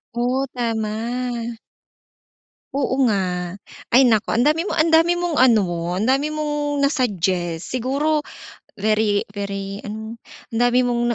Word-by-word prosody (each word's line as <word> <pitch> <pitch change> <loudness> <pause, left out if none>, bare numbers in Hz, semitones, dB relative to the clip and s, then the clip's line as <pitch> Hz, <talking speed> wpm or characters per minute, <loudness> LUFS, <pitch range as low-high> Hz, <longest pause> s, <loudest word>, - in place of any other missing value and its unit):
Oh, 250 +3 0
tama. 235 +1 -2 1.2
Oo 270 -1 0
nga. 180 -2 -2 0.3
Ay 260 +2 +6
naku 220 -3 +2
andami 300 +8 +2
mo 355 - -3
andami 330 +2 +4
mong 345 -6 0
ano, 180 -8 +2
andami 265 +8 +1
mong 295 -1 -2
na-suggest 185 - -1
siguro 280 +5 0 0.5
very 215 0 +1
very 200 -1 -5
ano 220 +2 -6 0.3
ang 225 - -3
dami 245 +1 +4
mong 240 -1 0
240 Hz, 115 wpm, -21 LUFS, 205-275 Hz, 1.2 s, Ay